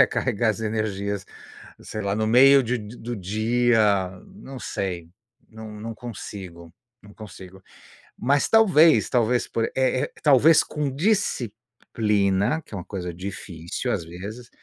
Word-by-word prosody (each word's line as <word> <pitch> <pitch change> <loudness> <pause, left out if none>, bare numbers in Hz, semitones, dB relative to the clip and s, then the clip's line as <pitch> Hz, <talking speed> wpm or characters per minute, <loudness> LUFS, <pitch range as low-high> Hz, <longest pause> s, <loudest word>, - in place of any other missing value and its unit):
recarregar 110 +2 +2
as 110 - -5
energias, 100 -3 -2 0.6
sei 110 - -6
lá, 100 0 -1
no 110 - 0
meio 135 +4 +6
de 125 +1 -1
de 105 +3 -10
do 120 0 -6
dia, 110 -1 +1 0.2
não 190 -10 -11
sei, 90 -7 -4 0.4
não 110 -1 -10
não 115 +1 -6
consigo, 95 -7 -9 0.3
não 105 0 -16
consigo, 95 -2 -12 0.6
mas, 140 +3 +1
talvez 175 -8 +5
talvez 120 0 +1
por 115 - -2
eh - - -6
eh, 130 -1 0
talvez 150 +2 +6
com 150 -2 -3
disciplina, 120 - -1
que - - -17
é - - -4
uma 90 - -7
coisa 90 -3 -5
difícil, 85 -2 -5
às 85 - -2
vezes. 105 +8 -9
110 Hz, 140 wpm, -24 LUFS, 100-125 Hz, 0.6 s, meio